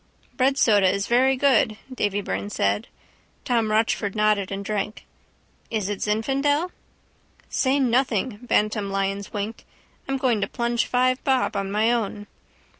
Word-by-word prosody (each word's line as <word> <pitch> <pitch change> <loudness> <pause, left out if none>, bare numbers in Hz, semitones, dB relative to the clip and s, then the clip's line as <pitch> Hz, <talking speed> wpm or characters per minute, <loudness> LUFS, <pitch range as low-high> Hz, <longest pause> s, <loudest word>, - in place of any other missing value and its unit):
—Breadsoda 230 -8 +4
is 200 0 -1
very 260 +3 +3
good, 250 -6 +3 0.2
Davy 205 -4 -1
Byrne 100 - -4
said. 100 0 0 0.6
Tom 230 -3 +1
Rochford 215 -1 0
nodded 210 -2 +1
and 200 0 -4
drank. 210 +1 -3 0.6
—Is 215 -3 -2
it 205 - -3
Zinfandel? 275 +10 0 0.8
—Say 270 +1 +1
nothing! 245 -4 +1
Bantam 210 -4 0
Lyons 195 0 -2
winked. 210 +2 -4 0.4
I'm 270 0 -1
going 245 -5 +1
to - - 0
plunge 235 -1 -1
five 255 +1 +1
bob 265 -2 +1
on 195 0 -2
my 215 +3 +2
own. 210 -3 -2
220 Hz, 135 wpm, -24 LUFS, 200-255 Hz, 0.8 s, Breadsoda